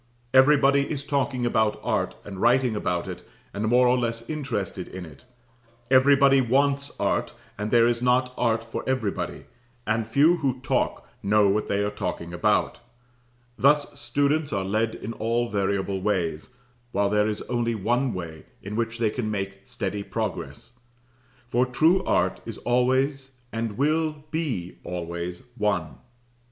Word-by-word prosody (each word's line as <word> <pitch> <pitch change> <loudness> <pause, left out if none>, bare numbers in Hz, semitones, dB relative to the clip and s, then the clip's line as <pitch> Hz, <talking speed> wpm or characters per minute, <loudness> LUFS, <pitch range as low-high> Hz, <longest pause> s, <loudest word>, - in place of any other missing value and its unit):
Everybody 140 +1 +5
is 140 -2 -4
talking 135 -3 0
about 110 -2 +1
art, - - -1
and 95 -2 -7
writing 125 -1 +3
about 90 -4 -1
it, - - -6 0.3
and 105 +2 -2
more 125 +2 +5
or 125 - +4
less 115 -1 -3
interested 135 - -3
in 90 -1 -8
it; 80 - -15 0.7
everybody 135 0 +6
wants 140 +3 +1
art, - - 0 0.2
and 105 +1 -3
there 115 0 +5
is 120 0 0
not 125 +1 +2
art 115 -2 +1
for 115 - -5
everybody, 120 -7 -2 0.4
and 110 +1 0
few 150 +9 +4
who 135 -5 -1
talk 135 -2 -1
know 105 +1 +4
what 105 +2 0
they 100 0 0
are 105 - -1
talking 90 -4 -4
about; 90 - +1 0.8
thus 145 +1 +3
students 145 +5 0
are 95 -3 -1
led 110 +3 0
in 115 - -6
all 115 +2 -1
variable 100 -1 -1
ways, 90 0 -2 0.4
while 100 0 +1
there 105 0 +3
is 105 - -4
only 120 -1 -1
one 120 +5 0
way 85 -5 -7 0.2
in 100 +2 -5
which 115 0 -2
they 115 -2 +1
can 110 -2 -3
make 100 -2 -3
steady 105 - -4
progress, 120 +3 -5 0.7
for 120 +1 +1
true 160 +9 +3
art - - +1
is - - -7
always 130 +2 +1 0.2
and 115 -2 -3
will 155 +1 0
be 130 - -3
always 85 +2 -5 0.2
one. 105 -1 0
115 Hz, 150 wpm, -25 LUFS, 105-135 Hz, 0.8 s, everybody